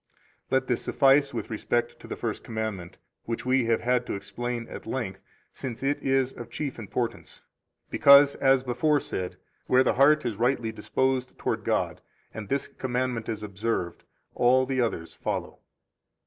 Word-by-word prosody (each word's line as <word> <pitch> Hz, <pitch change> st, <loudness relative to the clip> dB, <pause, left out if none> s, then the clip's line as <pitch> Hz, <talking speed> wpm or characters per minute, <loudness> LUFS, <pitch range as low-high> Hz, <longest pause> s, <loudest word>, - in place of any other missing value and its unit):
48 -, -, +1 dB
Let 130 Hz, 0 st, +1 dB
this 125 Hz, -, 0 dB
suffice 140 Hz, 0 st, +4 dB
with -, -, -5 dB
respect 120 Hz, +2 st, -1 dB
to -, -, -12 dB
the -, -, -4 dB
First -, -, -4 dB
Commandment, 110 Hz, -6 st, -4 dB, 0.3 s
which 115 Hz, +1 st, -4 dB
we 130 Hz, -1 st, +3 dB
have 115 Hz, -1 st, +1 dB
had 125 Hz, 0 st, +1 dB
to -, -, -2 dB
explain 120 Hz, +4 st, -4 dB
at -, -, -9 dB
length, 110 Hz, -6 st, -3 dB, 0.3 s
since 125 Hz, -1 st, -6 dB
it 140 Hz, +1 st, 0 dB
is 135 Hz, -1 st, +1 dB
of 120 Hz, -1 st, -9 dB
chief 135 Hz, +1 st, -4 dB
importance, 115 Hz, +2 st, -4 dB, 0.5 s
because, 140 Hz, 0 st, +7 dB
as 135 Hz, -1 st, +3 dB
before 135 Hz, +4 st, +2 dB
said, 90 Hz, -8 st, -5 dB, 0.3 s
where 130 Hz, +1 st, +5 dB
the -, -, +2 dB
heart 150 Hz, +2 st, +4 dB
is 115 Hz, -4 st, -2 dB
rightly 120 Hz, -1 st, +1 dB
disposed 130 Hz, +4 st, -1 dB
toward -, -, -2 dB
God -, -, -1 dB, 0.3 s
and 105 Hz, -2 st, -7 dB
this 140 Hz, 0 st, 0 dB
commandment 125 Hz, -3 st, -2 dB
is 110 Hz, -2 st, -4 dB
observed, 100 Hz, -3 st, -3 dB, 0.3 s
all 130 Hz, +2 st, +4 dB
the 130 Hz, -1 st, 0 dB
others 80 Hz, -8 st, -2 dB
follow. -, -, -4 dB
125 Hz, 165 wpm, -27 LUFS, 115-135 Hz, 0.5 s, because